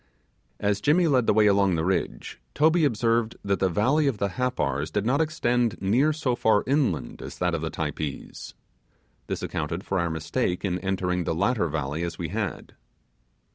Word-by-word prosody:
As 100 Hz, -1 st, 0 dB
Jimmy 160 Hz, -, +3 dB
led 130 Hz, -6 st, +2 dB
the -, -, +5 dB
way 110 Hz, 0 st, +4 dB
along 100 Hz, -3 st, +3 dB
the 80 Hz, 0 st, -1 dB
ridge, 95 Hz, -8 st, -2 dB
Toby 160 Hz, +2 st, +4 dB
observed 115 Hz, -2 st, +1 dB
that 100 Hz, -1 st, +1 dB
the 95 Hz, -, +2 dB
valley 130 Hz, -, +2 dB
of 130 Hz, -6 st, 0 dB
the 100 Hz, 0 st, -1 dB
Happars 80 Hz, -, -1 dB
did 105 Hz, +3 st, -1 dB
not 135 Hz, +6 st, +2 dB
extend 125 Hz, -7 st, 0 dB
near 120 Hz, +11 st, +2 dB
so 145 Hz, -5 st, -1 dB
far 110 Hz, -3 st, +3 dB
inland 125 Hz, -, 0 dB
as -, -, -8 dB
that 90 Hz, -1 st, 0 dB
of 85 Hz, -, -1 dB
the 80 Hz, -, -2 dB
Typees. 75 Hz, -2 st, -5 dB, 0.7 s
This -, -, -4 dB
accounted 80 Hz, +5 st, -3 dB
for 95 Hz, -, -1 dB
our 85 Hz, -1 st, 0 dB
mistake 90 Hz, +5 st, -2 dB
in 90 Hz, -2 st, -1 dB
entering 90 Hz, -1 st, -1 dB
the 80 Hz, -, -1 dB
latter 100 Hz, +1 st, +1 dB
valley 75 Hz, 0 st, -3 dB
as 85 Hz, 0 st, -4 dB
we 85 Hz, -3 st, -4 dB
had. 105 Hz, -1 st, -4 dB
100 Hz, 180 wpm, -26 LUFS, 85-125 Hz, 0.7 s, the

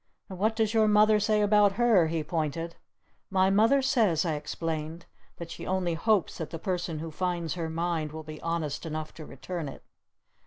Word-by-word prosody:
"And 185 Hz, -2 st, -8 dB
what 220 Hz, +3 st, +1 dB
does 220 Hz, -1 st, +1 dB
your 220 Hz, -1 st, +4 dB
Mother 210 Hz, 0 st, +5 dB
say 210 Hz, 0 st, +2 dB
about 205 Hz, -1 st, +4 dB
her?" 210 Hz, -6 st, +4 dB
he 160 Hz, -1 st, -2 dB
pointed. 165 Hz, +1 st, -3 dB, 0.5 s
"My 190 Hz, 0 st, +3 dB
Mother 225 Hz, +7 st, +4 dB
says," 215 Hz, -, +2 dB
I 165 Hz, -, 0 dB
explained, 160 Hz, +2 st, -4 dB, 0.3 s
"that 170 Hz, -1 st, -8 dB
she -, -, -7 dB
only 185 Hz, -2 st, 0 dB
hopes 200 Hz, +3 st, +1 dB
that 160 Hz, -, -4 dB
the 165 Hz, -, -5 dB
person 175 Hz, -2 st, -3 dB
who 160 Hz, +1 st, -6 dB
finds 175 Hz, -1 st, -2 dB
her 165 Hz, -2 st, -3 dB
mind 165 Hz, -2 st, -2 dB
will 160 Hz, 0 st, -7 dB
be 155 Hz, 0 st, -9 dB
honest 165 Hz, -3 st, -2 dB
enough 155 Hz, -1 st, -5 dB
to 155 Hz, -, -10 dB
return 160 Hz, +3 st, -5 dB
it!" -, -, -11 dB
170 Hz, 190 wpm, -28 LUFS, 160-205 Hz, 0.5 s, Mother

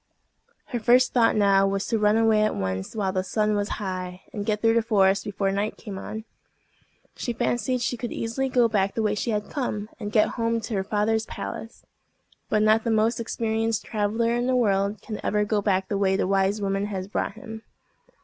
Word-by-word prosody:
Her 240 Hz, -, -2 dB
first 245 Hz, +3 st, +4 dB
thought 235 Hz, -2 st, +4 dB
now 195 Hz, -2 st, +4 dB
was 195 Hz, 0 st, -1 dB
to 225 Hz, -, 0 dB
run 210 Hz, +1 st, +3 dB
away 225 Hz, -1 st, +4 dB
at 215 Hz, -, +1 dB
once 95 Hz, -, -3 dB
while 200 Hz, -3 st, 0 dB
the 185 Hz, -1 st, 0 dB
sun 210 Hz, +3 st, 0 dB
was 205 Hz, 0 st, -1 dB
high, 185 Hz, -2 st, -5 dB
and 205 Hz, -, -3 dB
get 210 Hz, -1 st, +1 dB
through 225 Hz, +1 st, +3 dB
the 230 Hz, -, +3 dB
forest 200 Hz, -3 st, +3 dB
before 195 Hz, -1 st, -1 dB
night 200 Hz, +2 st, -2 dB
came 200 Hz, -4 st, -7 dB
on. 220 Hz, +2 st, -6 dB, 0.9 s
She 240 Hz, -, -3 dB
fancied 240 Hz, +1 st, 0 dB
she 245 Hz, 0 st, -1 dB
could 240 Hz, 0 st, -5 dB
easily 250 Hz, +4 st, -2 dB
go 245 Hz, -2 st, +4 dB
back 200 Hz, -3 st, 0 dB
the 225 Hz, -, 0 dB
way 210 Hz, -1 st, +1 dB
she 210 Hz, -, -2 dB
had 210 Hz, -2 st, -2 dB
come, 215 Hz, -7 st, -3 dB
and 210 Hz, -2 st, -5 dB
get 215 Hz, -1 st, +4 dB
home 230 Hz, 0 st, +1 dB
to 220 Hz, +2 st, -5 dB
her 195 Hz, -2 st, 0 dB
father's 215 Hz, +2 st, 0 dB
palace. 225 Hz, +1 st, -7 dB, 0.6 s
But 215 Hz, 0 st, +2 dB
not 215 Hz, +1 st, +4 dB
the 235 Hz, -, -1 dB
most 220 Hz, +1 st, +2 dB
experienced 225 Hz, -1 st, -1 dB
traveller 225 Hz, +2 st, 0 dB
in 240 Hz, +1 st, 0 dB
the 260 Hz, -, +2 dB
world 200 Hz, -3 st, +1 dB
can 215 Hz, -, -6 dB
ever 210 Hz, 0 st, +1 dB
go 210 Hz, 0 st, 0 dB
back 190 Hz, -2 st, +1 dB
the 200 Hz, 0 st, -1 dB
way 190 Hz, -1 st, +2 dB
the -, -, +1 dB
wise 195 Hz, +2 st, +1 dB
woman 195 Hz, +1 st, 0 dB
has 190 Hz, -2 st, -4 dB
brought 200 Hz, -, -2 dB
him. 220 Hz, +1 st, -9 dB
215 Hz, 210 wpm, -25 LUFS, 195-225 Hz, 0.9 s, first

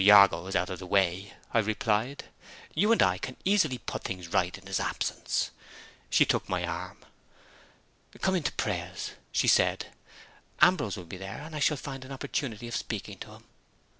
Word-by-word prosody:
Jago 100 Hz, -4 st, +7 dB
is 95 Hz, -, -4 dB
out 90 Hz, +1 st, +1 dB
of 90 Hz, -, -5 dB
the 95 Hz, -, -8 dB
way," 95 Hz, 0 st, +1 dB, 0.2 s
I 115 Hz, -, +5 dB
replied. 110 Hz, +4 st, 0 dB, 0.5 s
"You 205 Hz, +8 st, +3 dB
and 230 Hz, -, +6 dB
I 90 Hz, 0 st, +2 dB
can 130 Hz, +4 st, -5 dB
easily 185 Hz, -10 st, +3 dB
put -, -, -5 dB
things 90 Hz, -3 st, -5 dB
right 90 Hz, +2 st, +1 dB
in 95 Hz, -, -17 dB
his 95 Hz, -1 st, -1 dB
absence." -, -, -1 dB, 0.6 s
She -, -, +5 dB
took -, -, 0 dB
my 90 Hz, -1 st, 0 dB
arm. 85 Hz, +2 st, -6 dB, 1.1 s
"Come 190 Hz, -, +2 dB
in 180 Hz, -, +2 dB
to 150 Hz, -, 0 dB
prayers," 90 Hz, -3 st, -3 dB, 0.2 s
she -, -, +2 dB
said. -, -, +3 dB, 0.7 s
"Ambrose 145 Hz, -, +4 dB
will 90 Hz, -, -7 dB
be 90 Hz, -, -8 dB
there, 95 Hz, +6 st, -7 dB
and 160 Hz, +1 st, -8 dB
I -, -, -2 dB
shall 145 Hz, +1 st, +3 dB
find 135 Hz, -1 st, -6 dB
an 130 Hz, -, -11 dB
opportunity 120 Hz, -3 st, -3 dB
of 120 Hz, -, -4 dB
speaking -, -, -4 dB
to -, -, -8 dB
him." -, -, -15 dB
100 Hz, 185 wpm, -29 LUFS, 90-135 Hz, 1.1 s, Jago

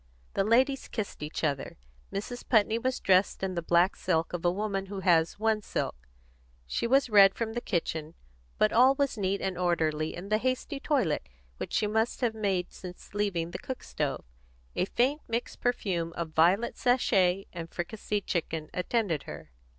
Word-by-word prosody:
The 195 Hz, -, +2 dB
ladies 260 Hz, +6 st, +2 dB
kissed 215 Hz, -8 st, -5 dB
each 150 Hz, +2 st, -5 dB
other. 140 Hz, -3 st, -1 dB, 0.3 s
Mrs. 245 Hz, +5 st, -5 dB
Putney 220 Hz, -1 st, +4 dB
was 255 Hz, +2 st, -1 dB
dressed 190 Hz, 0 st, +3 dB
in 190 Hz, -1 st, -1 dB
the 170 Hz, -, -2 dB
black 175 Hz, +3 st, +3 dB
silk 165 Hz, -2 st, 0 dB
of 175 Hz, -, -3 dB
a 175 Hz, -, +4 dB
woman 195 Hz, 0 st, -2 dB
who 195 Hz, 0 st, -5 dB
has 165 Hz, -3 st, +3 dB
one 220 Hz, 0 st, +1 dB
silk; -, -, -4 dB, 0.6 s
she 60 Hz, -, -1 dB
was 265 Hz, -1 st, +3 dB
red 195 Hz, -2 st, +7 dB
from 225 Hz, -1 st, -3 dB
the 240 Hz, -, -2 dB
kitchen, 160 Hz, -5 st, -2 dB, 0.4 s
but 105 Hz, -, +3 dB
all 260 Hz, +3 st, +6 dB
was 280 Hz, -2 st, 0 dB
neat 200 Hz, -2 st, -1 dB
and 185 Hz, -2 st, -2 dB
orderly 160 Hz, -3 st, 0 dB
in 180 Hz, +3 st, -8 dB
the 215 Hz, 0 st, +2 dB
hasty 255 Hz, +4 st, -2 dB
toilet 260 Hz, -, 0 dB, 0.3 s
which -, -, -6 dB
she -, -, +2 dB
must 220 Hz, +4 st, 0 dB
have 240 Hz, -3 st, +1 dB
made 195 Hz, -5 st, -1 dB
since 180 Hz, +1 st, -10 dB
leaving 190 Hz, -5 st, -1 dB
the -, -, -5 dB
cook 260 Hz, -, -6 dB
stove. -, -, -3 dB, 0.5 s
A -, -, +1 dB
faint, 265 Hz, +9 st, +1 dB
mixed 230 Hz, +1 st, -3 dB
perfume 180 Hz, -9 st, -1 dB
of 170 Hz, -1 st, -4 dB
violet 180 Hz, +9 st, +3 dB
sachet 195 Hz, -7 st, +3 dB
and 165 Hz, -2 st, -6 dB
fricasseed 205 Hz, +3 st, -3 dB
chicken 160 Hz, -3 st, -2 dB
attended 180 Hz, -4 st, -1 dB
her. -, -, -9 dB
195 Hz, 175 wpm, -29 LUFS, 170-230 Hz, 0.6 s, red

